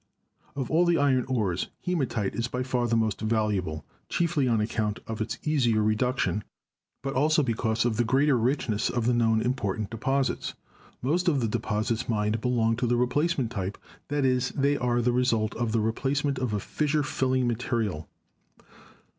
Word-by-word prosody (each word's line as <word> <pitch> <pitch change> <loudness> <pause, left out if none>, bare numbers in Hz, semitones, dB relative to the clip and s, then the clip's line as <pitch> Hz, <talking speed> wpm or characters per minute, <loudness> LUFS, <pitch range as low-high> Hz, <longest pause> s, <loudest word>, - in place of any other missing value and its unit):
Of 135 -3 -3
all 165 +3 +4
the 170 -1 +4
iron 130 -3 +2
ores, 105 -9 0 0.2
hematite 135 - -1
is 115 0 -1
by 125 +1 -3
far 125 -2 0
the 115 0 +2
most 110 -2 0
valuable, 105 -9 -1 0.2
chiefly 160 -6 +1
on 115 -3 +2
account 105 -1 -1
of 110 -1 -5
its 110 0 -2
easier 120 -8 +2
reduction, 110 0 0 0.6
but 135 0 -2
also 150 +3 +3
because 115 -2 0
of 115 -3 0
the 120 - +3
greater 135 +4 +3
richness 120 -3 0
of 120 -3 -1
the 125 - +3
known 115 -2 +2
important 110 -5 -2
deposits. 135 +4 -1 0.5
Most 170 +7 +1
of 150 -5 +3
the 115 - 0
deposits 110 +1 -1
mined 105 0 0
belong 115 -2 +2
to 120 0 0
the 120 +1 +2
replacement 135 0 +1
type; 100 -3 -3 0.3
that 145 -1 0
is, 125 -1 +2
they 140 +1 +2
are 120 -2 0
the 125 - +3
result 120 -3 +1
of 115 -1 -2
the 115 - +2
replacement 135 +5 0
of 125 -3 -1
a 105 - 0
fissure 150 +7 0
filling 130 -3 0
material. 115 - -2
120 Hz, 170 wpm, -27 LUFS, 110-135 Hz, 0.6 s, all